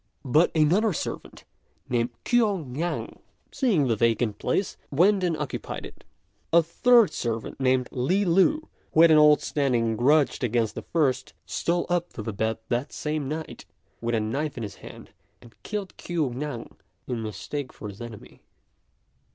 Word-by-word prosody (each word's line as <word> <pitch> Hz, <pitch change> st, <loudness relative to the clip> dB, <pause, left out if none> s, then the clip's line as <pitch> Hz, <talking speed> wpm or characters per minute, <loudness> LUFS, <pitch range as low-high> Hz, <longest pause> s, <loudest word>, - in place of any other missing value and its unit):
But 150 Hz, +6 st, +4 dB
another 180 Hz, +8 st, +3 dB
servant, -, -, -6 dB, 0.4 s
named 120 Hz, -1 st, 0 dB, 0.2 s
Kuo 210 Hz, -9 st, +2 dB
Ngan, 150 Hz, +8 st, -4 dB, 0.3 s
seeing 205 Hz, -, +2 dB
the 115 Hz, -, +2 dB
vacant 115 Hz, -1 st, +1 dB
place, 195 Hz, -, -1 dB
went 185 Hz, +7 st, +3 dB
and 170 Hz, -3 st, +1 dB
occupied 150 Hz, -3 st, -5 dB
it. -, -, -13 dB, 0.5 s
A 170 Hz, 0 st, +6 dB
third 235 Hz, +6 st, +4 dB
servant, 115 Hz, +1 st, -3 dB
named 130 Hz, -1 st, +2 dB
Li 180 Hz, +11 st, +1 dB
Lu, 195 Hz, -, +3 dB, 0.3 s
who 160 Hz, -, +5 dB
had 165 Hz, -, +7 dB
an 155 Hz, -, +7 dB
old 150 Hz, 0 st, +6 dB
standing 120 Hz, -6 st, +1 dB
grudge 145 Hz, +4 st, +3 dB
against 115 Hz, -2 st, +1 dB
the -, -, -5 dB
first, 145 Hz, -, 0 dB
stole 170 Hz, -, -1 dB
up 175 Hz, 0 st, -1 dB
to 110 Hz, -, -6 dB
the 110 Hz, -, -4 dB
bed 110 Hz, +2 st, -1 dB
that 125 Hz, +4 st, -1 dB
same 150 Hz, -2 st, -3 dB
night 155 Hz, +1 st, -6 dB, 0.4 s
with 120 Hz, 0 st, 0 dB
a -, -, +2 dB
knife 135 Hz, +8 st, -2 dB
in 115 Hz, -, -4 dB
his 100 Hz, -2 st, -7 dB
hand, -, -, -12 dB, 0.3 s
and 120 Hz, -2 st, -17 dB
killed 205 Hz, -3 st, -5 dB
Kuo 160 Hz, -7 st, -2 dB
Ngan 135 Hz, -2 st, -5 dB, 0.4 s
in 120 Hz, -3 st, -3 dB
mistake 130 Hz, +5 st, -5 dB
for 105 Hz, -, -9 dB
his 100 Hz, +2 st, -10 dB
enemy. 115 Hz, -3 st, -10 dB
145 Hz, 160 wpm, -26 LUFS, 120-170 Hz, 0.5 s, had